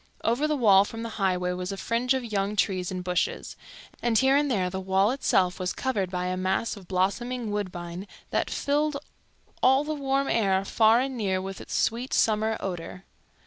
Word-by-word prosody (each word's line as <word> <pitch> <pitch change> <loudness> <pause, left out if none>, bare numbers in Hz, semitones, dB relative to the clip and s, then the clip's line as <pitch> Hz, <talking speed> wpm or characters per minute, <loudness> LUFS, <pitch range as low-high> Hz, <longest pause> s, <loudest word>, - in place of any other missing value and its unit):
Over 245 +7 +1
the 305 - +1
wall 200 -7 +6
from 225 +2 -7
the 230 - -4
highway 180 -2 +1
was 180 +1 -4
a 195 - -5
fringe 240 +5 0
of 260 -2 -2
young 205 -2 -1
trees 185 -3 0
and 185 -1 -4
bushes, 180 -1 -2 0.5
and 235 -2 +2
here 265 +4 +4
and 290 0 +2
there 195 -7 +1
the 190 +1 -4
wall 190 +3 +2
itself 190 -9 +1
was 180 -1 -2
covered 210 -9 -1
by 180 -1 -3
a 180 0 -1
mass 185 +5 -1
of 195 -4 -13
blossoming 220 +5 -1
woodbine 180 -2 -5 0.2
that - - 0
filled 295 +1 0 0.6
all 265 +2 +5
the 310 +1 -3
warm 275 -1 0
air 195 -4 +1
far 225 +3 +4
and 265 0 -3
near 190 -4 0
with 195 +1 -6
its - - -6
sweet 240 +3 0
summer 220 0 +2
odor. 180 0 -6
205 Hz, 190 wpm, -26 LUFS, 185-250 Hz, 0.6 s, wall